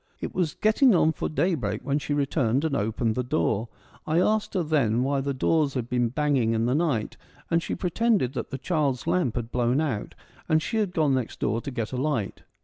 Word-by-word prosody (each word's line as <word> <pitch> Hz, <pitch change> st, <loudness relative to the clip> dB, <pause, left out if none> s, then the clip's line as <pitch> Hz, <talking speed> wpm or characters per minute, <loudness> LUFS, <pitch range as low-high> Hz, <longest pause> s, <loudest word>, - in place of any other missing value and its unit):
It -, -, -5 dB
was 175 Hz, -5 st, -1 dB
getting 225 Hz, +3 st, +4 dB
on^for 160 Hz, -3 st, +1 dB
day 175 Hz, +4 st, +1 dB
break 105 Hz, -8 st, -2 dB
when 140 Hz, +1 st, +1 dB
she 145 Hz, 0 st, -2 dB
returned 135 Hz, -1 st, +1 dB
and 150 Hz, -3 st, 0 dB
opened 110 Hz, +1 st, 0 dB
the 125 Hz, -, -1 dB
f 125 Hz, -, -9 dB
door. 115 Hz, -7 st, 0 dB, 0.4 s
I 160 Hz, +2 st, +2 dB
asked 215 Hz, +2 st, +1 dB
her 180 Hz, -, +1 dB
then 130 Hz, -7 st, +1 dB
why 140 Hz, 0 st, 0 dB
the 140 Hz, +1 st, -2 dB
doors 140 Hz, +1 st, +1 dB
had 120 Hz, -2 st, -3 dB
been 120 Hz, -1 st, +1 dB
banging 130 Hz, -4 st, +1 dB
in 115 Hz, 0 st, +1 dB
the 125 Hz, -, +1 dB
night, 145 Hz, -8 st, 0 dB, 0.3 s
and 170 Hz, 0 st, +3 dB
she -, -, -3 dB
pretended 185 Hz, -, +1 dB
that -, -, -4 dB
the 135 Hz, -, -4 dB
child's 140 Hz, -4 st, -1 dB
lamp 135 Hz, -11 st, +1 dB
had 120 Hz, -1 st, -4 dB
blown 125 Hz, +2 st, +1 dB
out, 135 Hz, -10 st, -2 dB, 0.3 s
and 155 Hz, -, +4 dB
she 225 Hz, -, -3 dB
had 205 Hz, -4 st, 0 dB
gone 155 Hz, -5 st, +2 dB
next 130 Hz, -3 st, -2 dB
door 115 Hz, +2 st, 0 dB
to -, -, -5 dB
get 115 Hz, -5 st, -4 dB
a -, -, -2 dB
light. 130 Hz, -7 st, -2 dB
140 Hz, 225 wpm, -26 LUFS, 120-160 Hz, 0.4 s, getting